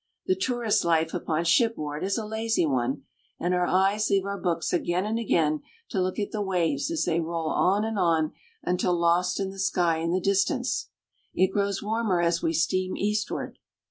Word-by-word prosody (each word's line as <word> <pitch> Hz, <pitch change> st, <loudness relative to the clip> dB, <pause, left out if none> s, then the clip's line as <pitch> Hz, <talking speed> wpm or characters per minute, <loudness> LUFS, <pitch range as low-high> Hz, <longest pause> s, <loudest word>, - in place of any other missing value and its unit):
The 375 Hz, -, +3 dB
tourist's 240 Hz, -, 0 dB
life 165 Hz, -1 st, +1 dB
upon 165 Hz, -2 st, -1 dB
shipboard 170 Hz, -, +1 dB
is 195 Hz, +1 st, 0 dB
a 220 Hz, -, -3 dB
lazy 220 Hz, -3 st, 0 dB
one, 130 Hz, -1 st, -1 dB, 0.4 s
and 175 Hz, +1 st, 0 dB
our 180 Hz, 0 st, +1 dB
eyes 195 Hz, +3 st, +2 dB
leave 195 Hz, -1 st, +2 dB
our 200 Hz, 0 st, -3 dB
books 170 Hz, -2 st, -1 dB
again 175 Hz, +2 st, 0 dB
and 220 Hz, +2 st, -1 dB
again 155 Hz, -8 st, +1 dB, 0.3 s
to 195 Hz, -, -1 dB
look 185 Hz, 0 st, -1 dB
at 205 Hz, -, -2 dB
the 215 Hz, -, -2 dB
waves 170 Hz, -7 st, 0 dB
as 330 Hz, -2 st, 0 dB
they 170 Hz, -1 st, +1 dB
roll 165 Hz, -1 st, -2 dB
on 200 Hz, +4 st, +2 dB
and 220 Hz, -2 st, -2 dB
on 165 Hz, -3 st, +2 dB, 0.3 s
until 180 Hz, 0 st, +1 dB
lost 175 Hz, +2 st, +2 dB
in 195 Hz, -1 st, -2 dB
the 195 Hz, -, -11 dB
sky 175 Hz, -3 st, +1 dB
in 165 Hz, +1 st, -1 dB
the 185 Hz, -, +2 dB
distance. 200 Hz, +7 st, 0 dB, 0.5 s
It 185 Hz, +1 st, +3 dB
grows 200 Hz, -1 st, 0 dB
warmer 215 Hz, -3 st, 0 dB
as 170 Hz, 0 st, +1 dB
we 160 Hz, -, +1 dB
steam 185 Hz, +3 st, 0 dB
eastward. 210 Hz, +1 st, -2 dB
185 Hz, 190 wpm, -26 LUFS, 170-205 Hz, 0.5 s, The